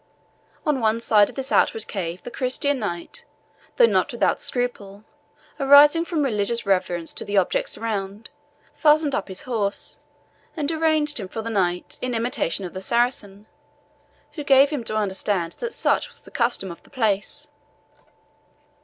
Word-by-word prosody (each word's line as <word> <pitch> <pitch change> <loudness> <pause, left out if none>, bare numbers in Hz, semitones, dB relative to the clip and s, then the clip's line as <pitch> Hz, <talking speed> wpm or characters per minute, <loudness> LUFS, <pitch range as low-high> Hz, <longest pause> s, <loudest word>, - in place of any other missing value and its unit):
On 300 -4 +1
one 220 -1 +1
side 210 -3 +4
of - - -12
this 270 0 -4
outward 220 -1 +2
cave 180 -3 -5
the 245 - -8
Christian 260 +2 -1
knight, 175 -6 -3 0.5
though 485 - +7
not - - +1
without - - 0
scruple, 215 -5 -3 0.6
arising 290 +4 +7
from 325 -4 -1
religious 230 -2 0
reverence 180 -3 0
to - - -5
the 205 0 -2
objects 185 - +1
around, 210 -1 -4 0.4
fastened 300 -2 +3
up 200 - -2
his 190 -1 -7
horse, 210 -5 -2 0.6
and 300 0 0
arranged 310 -3 +1
him 195 - -5
for 220 +4 -6
the 230 - -4
night, 180 -4 -1
in 250 -1 -2
imitation 225 -5 -1
of 175 - -8
the 185 - -6
Saracen, 215 -3 -1 0.9
who 300 - -6
gave 275 +1 +5
him 285 -6 -3
to 215 - -1
understand 190 -4 -1
that 475 - -3
such - - +1
was - - -11
the - - -16
custom 235 -6 0
of 170 - -11
the - - -23
place. 215 -7 -1
225 Hz, 160 wpm, -23 LUFS, 195-275 Hz, 0.9 s, though